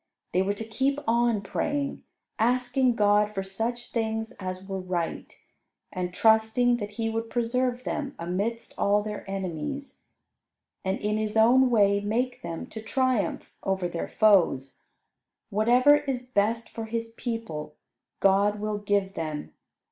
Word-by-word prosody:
They 185 - +3
were 200 +2 0
to 225 - -5
keep 270 +5 0
on 235 -2 +2
praying; 285 +7 -2 0.4
asking 250 +2 +2
God 210 0 +3
for 195 - -1
such 230 +5 -3
things 225 0 -1
as 185 0 -5
were 195 -1 -3
right, 180 -2 -3 0.6
and 180 -1 -2
trusting 220 +4 +4
that 210 -2 -6
He 225 +1 -2
would 225 0 -2
preserve 245 +1 0
them 280 +1 -3
amidst 200 +7 -3
all 205 +1 +3
their 210 -1 -5
enemies; 195 - -4 0.8
and 190 +1 0
in 210 +1 0
His 215 0 -1
own 250 +4 +6
way 200 -3 +4
make 245 +5 -1
them 165 -1 -5
to 220 - -7
triumph 250 0 0
over 190 -2 0
their 170 -1 -4
foes. 175 -11 +3 0.7
Whatever 245 +7 +5
is 270 -4 -3
best 230 -1 0
for 225 - -6
His 230 0 -4
people, 225 -11 -5 0.5
God 200 +2 +3
will 210 0 -2
give 200 -1 0
them. 155 -3 -5
220 Hz, 140 wpm, -27 LUFS, 195-240 Hz, 0.8 s, own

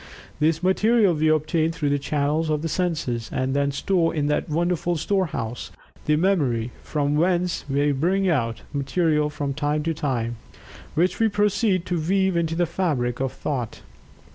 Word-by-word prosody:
This 160 +2 +1
material 205 +1 +3
we 155 0 +1
obtain 155 +1 +2
through 150 -3 -2
the 145 - +1
channels 150 +3 0
of 155 0 0
the - - 0
senses, 150 -10 -2
and 130 +1 -1
then 140 0 +1
store 165 +4 +1
in 150 -2 0
that 150 - 0
wonderful 175 +2 0
storehouse, 155 - -2 0.4
the 150 - +4
Memory, 145 - +1
from 145 -1 -1
whence 175 +2 +1
we 145 +2 +2
bring 180 +8 +1
out 115 -9 0
material 150 +2 +1
from 145 -1 -3
time 150 +1 -1
to 165 +1 0
time, 120 -6 -2 0.6
which 175 +3 +1
we 225 - +4
proceed 205 -2 +1
to 175 -3 -1
weave 190 +2 +1
into 165 -1 0
the 175 +1 +2
fabric 150 -9 -1
of 135 -1 -1
Thought. 125 -6 -4
155 Hz, 165 wpm, -24 LUFS, 140-175 Hz, 0.6 s, the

